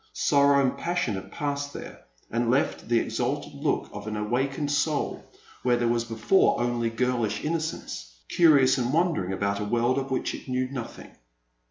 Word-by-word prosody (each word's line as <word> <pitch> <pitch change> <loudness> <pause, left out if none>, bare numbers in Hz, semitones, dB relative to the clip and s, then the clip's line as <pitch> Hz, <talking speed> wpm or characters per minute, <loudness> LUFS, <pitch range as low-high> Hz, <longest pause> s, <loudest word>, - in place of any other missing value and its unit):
Sorrow 140 0 +4
and 130 - +1
passion 175 -10 -1
have 95 0 -6
passed 145 +3 -3
there, - - -9 0.3
and 115 0 0
left 130 -1 0
the 120 - +4
exalted - - -2
look - - -1
of 105 +1 -7
an 105 0 -3
awakened 135 +7 -1
soul, 145 0 0 0.4
where 125 -1 +2
there 120 0 +1
was 115 0 +1
before 115 - +2
only 120 -1 0
girlish 115 -2 -1
innocence, 155 - -3 0.2
curious 140 -6 +5
and 125 +2 -1
wondering 165 - +1
about 100 +1 -1
a - - -2
world 120 +5 +1
of 135 0 -5
which 130 - -1
it - - -9
knew 130 0 0
nothing. 125 -4 -7
125 Hz, 170 wpm, -26 LUFS, 115-140 Hz, 0.4 s, curious